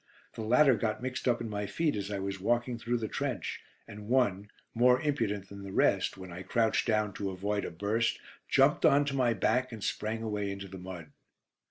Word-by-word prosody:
The - - -6
latter 125 +5 +5
got 110 +1 -1
mixed 130 0 -3
up 120 -1 +2
in 115 - -3
my 105 -1 -3
feet 155 +7 0
as 100 -1 -3
I 100 - -2
was 100 0 -3
walking 120 +4 0
through 120 +1 -1
the 110 -2 -3
trench, - - -3 0.3
and 105 -1 -10
one, 105 -6 +1 0.2
more 125 +2 +5
impudent 110 -10 -1
than 100 0 -9
the 100 -1 -7
rest, - - +2
when 95 -1 -9
I 90 - -7
crouched 110 +5 +1
down 110 -2 +1
to 100 - -3
avoid 100 +2 -2
a - - -3
burst, 105 +7 0 0.3
jumped - - +4
on 145 +1 +5
to 140 -1 -2
my 120 -3 +2
back 125 +6 +1
and 110 -3 -7
sprang 110 +1 -2
away 105 -2 -2
into 100 0 -6
the 95 0 -9
mud. 90 -4 -8
110 Hz, 210 wpm, -30 LUFS, 100-120 Hz, 0.3 s, latter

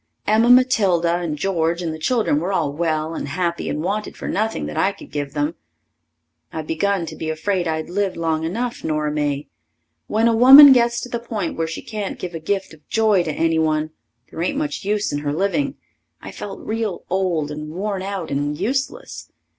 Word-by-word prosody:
Emma 220 +3 +3
Matilda 195 -9 +4
and 165 -4 -3
George 170 -1 0
and 165 -2 -2
the 160 - -8
children 215 - +1
were 175 +5 -2
all 155 -7 0
well 160 0 -1
and 145 - -4
happy 170 +3 -2
and 150 - -3
wanted 205 +4 -3
for - - -6
nothing 220 +2 -1
that - - -6
I 195 - +2
could 200 - -14
give 145 -1 -4
them. 150 +2 -1 1.0
I 160 - -4
begun 170 +4 0
to - - -8
be 160 - -4
afraid 175 +3 -1
I'd 160 0 -2
lived 195 +1 -1
long 160 -1 -1
enough, 235 +9 -3
Nora 150 -1 -1
May. 145 -1 -2 0.6
When 220 +2 +2
a 230 - +3
woman 270 +4 +10
gets 235 -1 +2
to 250 - -7
the 235 - -3
point 220 -7 -4
where 165 0 -1
she 160 - -6
can't 210 -3 -5
give 180 -1 -6
a 165 - -4
gift 190 +2 -2
of 155 -1 -19
joy 215 -4 +3
to 165 -2 -2
anyone, 160 -1 +1 0.4
there - - -6
ain't 185 +11 -1
much 295 -5 -3
use 205 -3 -1
in 145 - -1
her 145 -1 -2
living. 200 - 0 0.4
I - - -9
felt 195 -1 -8
real 220 -4 -3
old 175 -6 0
and 150 +1 -6
worn 195 +4 -3
out 195 -4 -4
and 145 +1 -1
useless. 270 - -3
175 Hz, 200 wpm, -21 LUFS, 155-215 Hz, 1.0 s, woman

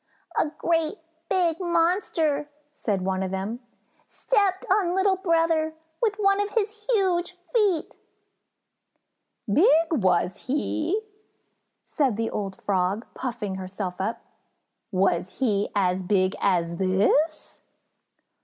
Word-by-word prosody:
"A 310 - +2
great 325 -2 0 0.3
big 345 -3 +1
monster," 335 -4 +1 0.2
said 200 -9 -2
one 190 0 -1
of 190 - -1
them, 195 +5 -3 0.5
"stepped 405 -1 0
on 375 -3 +2
little 380 0 +3
brother 330 -3 +1 0.3
with 435 -4 +2
one 395 -1 +2
of 410 - -1
his 425 -1 -2
huge 360 -5 +1 0.2
feet!" 405 -9 +1 1.5
"Big, 295 - +4 0.3
was 185 - +1
he!" 310 +7 0 0.9
said 265 -8 0
the 225 0 -1
old 195 -2 -4
Frog, 195 +3 0
puffing 235 -6 -4
herself 190 -1 -5
up. 225 +4 -3 0.7
"Was 185 -1 0
he 210 -6 +1
as 185 -2 +1
big 185 0 +1
as 170 -3 +1
this?" 200 - +1
290 Hz, 110 wpm, -25 LUFS, -, 1.5 s, Big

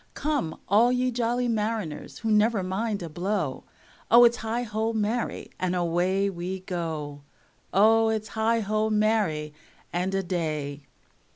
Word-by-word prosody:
Come 285 - -2
all 225 +5 +5
ye 250 0 +1
jolly 240 +1 0
mariners 215 -8 -2
who 225 -1 -2
never 210 -1 +3
mind 200 +2 -2
a - - -4
blow, 175 -3 -2 0.4
O, 235 +1 +8
its 240 0 +5
heigho, 225 -1 -2
marry, 220 +3 -2
and 185 0 0
away 180 +3 +1
we 185 0 -4
go. 160 -6 -4 0.5
O, 225 +3 +5
its 220 -1 -2
heigho, 220 -1 0
marry, 210 -9 +1 0.4
and 180 +2 -1
a 195 - 0
day! 150 -5 -3
210 Hz, 130 wpm, -26 LUFS, 175-225 Hz, 0.5 s, O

